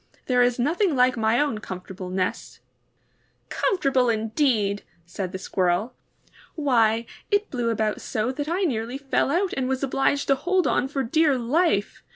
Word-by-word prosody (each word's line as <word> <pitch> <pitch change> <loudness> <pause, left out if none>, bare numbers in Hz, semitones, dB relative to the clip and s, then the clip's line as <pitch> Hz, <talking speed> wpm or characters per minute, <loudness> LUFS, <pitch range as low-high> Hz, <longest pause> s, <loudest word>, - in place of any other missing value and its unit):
There 250 -1 +2
is 245 0 +3
nothing 325 - +1
like 255 0 +4
my 225 +1 +2
own 285 -7 0
comfortable 185 -1 -7
nest!" 185 0 -3 0.9
^^Comfortable 265 -9 +1
indeed!" 220 -2 0 0.2
said 180 +1 -5
the 190 - -4
Squirrel. 185 +5 0 0.6
^Why, 230 -6 +2 0.2
it 410 0 +1
blew 240 -3 -1
about 220 -2 -1
so 220 +3 -2
that 290 +3 -4
I 360 +4 0
nearly 245 -5 -1
fell 275 -1 0
out 365 +5 0
and 260 -1 -1
was 265 +1 -1
obliged 275 +1 +1
to 275 - +5
hold 360 +6 +1
on 260 - +1
for 275 0 -2
dear 295 +3 +2
life. 250 - 0
250 Hz, 160 wpm, -24 LUFS, 220-285 Hz, 0.9 s, to